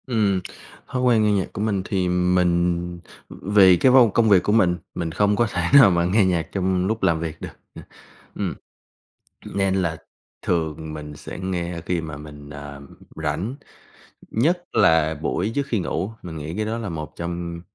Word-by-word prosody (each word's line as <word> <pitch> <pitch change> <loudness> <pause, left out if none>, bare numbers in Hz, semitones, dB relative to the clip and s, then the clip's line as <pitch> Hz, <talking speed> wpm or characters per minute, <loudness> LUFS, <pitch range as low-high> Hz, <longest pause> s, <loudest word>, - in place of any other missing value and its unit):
Ừm, 105 -6 +1 0.5
thói 130 - -3
quen 120 -4 +4
nghe 105 - +3
nhạc 100 -2 -1
của 100 - -4
mình 105 -3 0
thì 95 -3 -1
mình 90 -1 +1 0.3
vì 95 -2 +4
cái 125 +9 +4
vô 125 -3 +7
công 115 -2 +3
việc 95 -3 +5
của - - 0
mình, 90 -6 +3 0.2
mình 85 -2 -3
không 105 +4 +2
có 120 +2 +2
thể 90 - -1
nào 140 -7 +9
mà 85 -1 +1
nghe 100 +3 +3
nhạc 85 -3 0
trong 95 -1 0
lúc 110 +2 -2
làm 80 -1 +2
việc 80 -1 -5
được, - - -5 0.3
ừm, - - -10 0.5
ừm. - - -2 1.0
Nên 95 -1 +1
là 85 -4 -1 0.4
thường 80 -2 -2
mình 75 -1 -8
sẽ - - -9
nghe 90 -2 -3
khi 90 -2 -1
mà 80 -3 -7
mình, 75 -1 -11
ờ, 70 -1 -9 0.3
rảnh, 80 - -3 0.8
nhất 170 +10 +1
là 80 -2 +3
buổi 90 +7 -2
trước 140 -1 -1
khi 115 -7 -1
ngủ, 90 +3 -3
mình 85 -2 -7
nghĩ 80 +3 -6
cái 110 - -1
đó 110 +2 -3
là 115 -3 -4
một 80 -3 -6
trong 85 0 -5
90 Hz, 185 wpm, -22 LUFS, 80-105 Hz, 1.0 s, nào